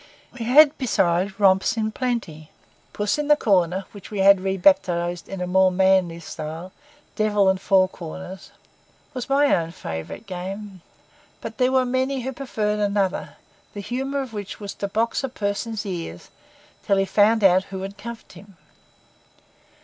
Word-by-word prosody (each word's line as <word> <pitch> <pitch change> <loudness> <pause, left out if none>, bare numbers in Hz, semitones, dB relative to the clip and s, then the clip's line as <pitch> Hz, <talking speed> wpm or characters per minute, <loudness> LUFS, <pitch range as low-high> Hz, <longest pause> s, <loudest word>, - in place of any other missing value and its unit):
We 235 -3 -6
had, 290 +4 +6
besides, 195 -5 0
romps 190 +2 +3
in 220 -1 -1
plenty. 215 -12 -3 0.4
Puss 205 +6 -1
in 295 - -2
the 295 - +6
Corner, 190 - +1
which 205 -2 -12
we 210 - -6
had 195 0 +6
rebaptized, 180 -3 +1
in 180 -2 -4
more 190 +1 +4
manly 185 -2 +2
style, 160 +3 -7 0.4
Devil 210 -2 +2
and 190 0 0
four 190 -2 +4
Corners, 185 +2 -9 0.6
was 255 0 -5
my 285 +1 +4
own 165 -1 -2
favourite 80 - -7
game; 190 +1 -7 0.6
but - - -8
there 255 0 +3
were 260 -1 +3
many 260 +1 -1
who 265 +2 -4
preferred 215 -6 -2
another, 200 -2 -1 0.4
the - - -5
humour 265 +6 -3
of 260 -4 -7
which 205 -2 -6
was 200 -1 -6
to 200 - -4
box 225 +6 -1
a 270 - -2
person's 215 -1 -3
ears 170 - -6 0.5
until 200 - +1
he 195 - +2
found 210 +3 +3
out 190 0 +5
who 190 -1 -7
had 195 +1 -6
cuffed 235 +1 -9
him. 190 0 -15
200 Hz, 155 wpm, -23 LUFS, 185-230 Hz, 0.6 s, had